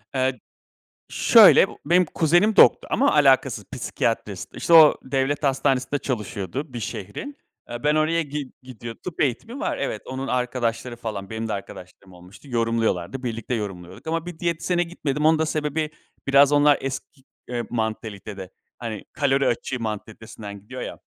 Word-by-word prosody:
Eee, 130 0 0 0.7
şöyle 220 -4 +7
b - - -10
benim 175 +4 +4
kuzenim 175 +8 +2
doktor - - +6
ama - - +3
alakasız - - +3
psikiyatrist. - - -3
İşte 170 - -2
o 160 -2 +9
devlet 135 +2 -1
hastanesinde 135 0 +1
çalışıyordu 120 - -4
bir 120 - -5
şehrin. 105 - -6 0.3
Eee, 120 +4 -6
ben 150 +1 +3
oraya 160 +2 +2
gi 145 -2 -6
gidiyordum. 120 -2 -9
Tıp 180 - -6
eğitimi 220 - -1
var. - - -2
Evet, 125 -6 -3
onun 130 +1 -5
arkadaşları 125 -1 -2
falan. 105 -4 -6
Benim 110 0 -4
de - - -2
arkadaşlarım 95 -1 -9
olmuştu. 90 +10 -15
Yorumluyorlardı. 115 -1 -1
Birlikte 115 0 -3
yorumluyorduk 95 - -6
ama 165 +1 -2
bir 175 -2 -8
diyetisyene 175 +1 0
gitmedim. 150 -3 -2
Onun 160 0 +5
da 160 - +1
sebebi 155 0 -2 0.4
biraz 140 +1 +5
onlar 145 0 +5
eski, 135 +1 -6 0.3
eee, 120 -1 -3
mantalitede. 110 -4 -4 0.3
Hani 110 -4 -6
kalori 140 -2 +1
açığı 125 +1 -1
mantalitesinden 110 -1 -7
gidiyor 105 - -8
ya. - - -6
130 Hz, 150 wpm, -23 LUFS, 110-150 Hz, 0.7 s, o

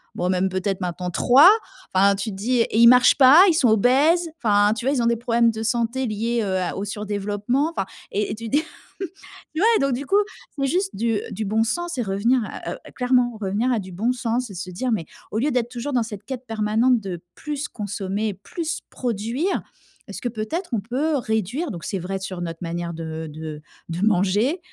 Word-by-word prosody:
bon 180 - -1
même 185 +1 +1
peut-être 190 +1 -2
maintenant 180 0 -3
3 270 - +7 0.4
enfin 200 +1 +4
tu 205 +3 -3
dis 230 +5 0
et 225 - 0
ils 235 - +8
marchent 250 0 +7
pas 280 +6 +8
ils 355 - +4
sont 260 -7 +4
obèses 275 - +4 0.2
enfin 205 -1 +4
tu 235 - -5
vois? 275 +2 +2
Ils 250 - +1
ont - - +2
des 235 - +3
problèmes 235 0 +2
de 220 0 -6
santé 235 +3 0
liés, 230 +2 -1
heu, 190 -2 -1
à 180 -2 -2
au 195 - -3
surdéveloppement 205 +7 -1
enfin 195 - -2 0.3
et 205 +1 -1
et - - -3
tu 225 0 -7
dis 295 +3 +2 0.9
ouais 440 +7 +4
donc 275 -1 +1
du 265 +4 -3
coup 395 - +3 0.4
c'est 275 -1 0
juste 375 +7 0
du 225 0 0
du 215 +2 -3
bon 220 +3 +2
sens 345 +8 -2
et - - 0
revenir 220 +6 +1
à - - -6
heu - - -8
à - - -12
clairement 250 -2 +1
revenir 205 +6 0
à 230 - +1
du 190 -2 -8
bon 225 +8 0
sens. 245 -1 -2
Et - - -9
se 185 +1 -5
dire 250 +8 -2
mais 195 -8 -1 0.3
au 215 - -2
lieu 290 +5 +1
d'être 240 -1 0
toujours 250 +3 -5
dans 245 -2 +2
cette 210 -3 -8
quête 260 0 -6
permanente 225 +3 +2
de 180 -4 -6
plus 300 -1 -4
consommer, 205 0 -3
plus 325 - -4
produire, 240 - -2 0.5
est-ce - - -7
que - - -2
peut-être 240 - -4
on 220 - +1
peut 270 +9 -1
réduire 235 - -2
donc 170 -4 -7
c'est 195 - -2
vrai 190 +2 -4
sur 190 -2 -5
notre 165 -1 -5
manière 170 0 -4
de 160 0 -5
de 155 0 -7 0.3
de 170 +2 -4
manger, 210 - +2
225 Hz, 215 wpm, -23 LUFS, 195-255 Hz, 0.9 s, ils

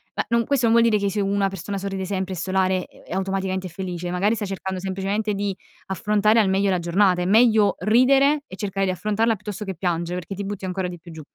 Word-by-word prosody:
Ma - - -1
non 235 0 +2
questo 275 -4 +1
non 225 - +4
vuol 235 0 +5
dire 210 -1 +2
che 200 - +1
se 210 - -2
una 195 0 +1
persona 195 +2 -5
sorride 195 -1 -4
sempre, 190 -1 -3
è - - -6
solare 185 0 0
e - - -20
e - - -6
automaticamente 190 0 -2
è - - -9
felice. 180 -1 -5
Magari 195 +5 +1
sta 215 -2 -3
cercando 190 -1 -4
semplicemente 195 +3 -2
di 200 -1 -2 0.3
affrontare 210 +3 +2
al 200 -3 +3
meglio 195 +1 +2
la 180 - +1
giornata. 180 +1 +2
È - - -1
meglio 215 0 +4
ridere 275 +6 +4
e 185 - -9
cercare 195 -1 -2
di - - +1
affrontarla 215 +5 0
che 205 -1 -6
piangere 175 0 -2
perché 180 +3 -7
ti 200 - -4
butti 200 -1 -5
ancora 185 0 -2
di 175 - -7
più 170 +1 -13
giù. 160 -1 -9
195 Hz, 240 wpm, -23 LUFS, 185-210 Hz, 0.3 s, vuol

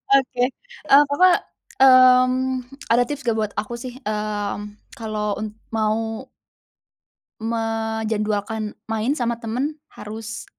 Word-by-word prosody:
Oke, 255 -2 +1 0.5
eee, 280 +2 +8
apa 365 +5 +6 0.5
mmm, 255 0 +6 0.3
ada 240 +1 +5
tips 290 +1 -5
nggak 230 -2 0
buat 215 -1 -1
aku 215 +3 -5
sih? 250 -1 -6
Mmm, 210 -1 -2 0.4
kalau 215 -2 -3
un 215 - -3 0.3
mau 220 +2 -1 1.2
menjadwalkan 220 -1 -2
main 225 +6 -1
sama 235 -2 -1
temen 265 +7 -3
harus 220 +2 -8
225 Hz, 110 wpm, -22 LUFS, 215-255 Hz, 1.2 s, eee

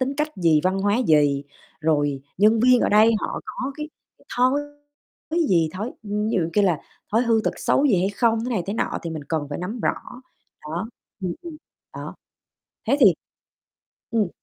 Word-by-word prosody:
tính 265 +2 -1
cách 300 +1 0
gì, 165 -4 +3
văn 190 +1 +1
hóa 205 +2 +2
gì, 145 -3 +3 0.4
rồi 145 -3 +1 0.2
nhân 215 +3 +5
viên 250 +1 +5
ở - - +2
đây 215 +2 +6
họ - - -3
có 260 +2 -5
cái 300 0 -5 0.5
thói 255 +3 +3 0.7
thứ 330 0 +1
gì, 165 -3 +3
thói 210 +7 -4
ví 210 - -10 0.2
dụ 170 -6 +1
kia 205 - +3
là 175 -6 +2 0.3
thói 225 - +4
hư 230 -2 +3
tật - - +1
xấu 290 - +2
gì 205 -10 +3
hay 185 - +1
không, 225 +2 +1
thế 250 - -3
này 210 -8 0
thế 200 - -2
nọ, - - -1
thì 170 - -4
mình 155 -3 -6
cần 155 -3 -1
phải 145 - -4
nắm 205 +7 -5
rõ. - - +2 0.7
Đó, 165 +8 -4 0.3
ừm, 180 -2 -1
ừm, 335 -3 -8 0.4
đó. - - -7 0.7
Thế 275 - +3
thì 200 -9 +7 1.0
ừm. 220 -5 +1
205 Hz, 190 wpm, -23 LUFS, 165-245 Hz, 1.0 s, thì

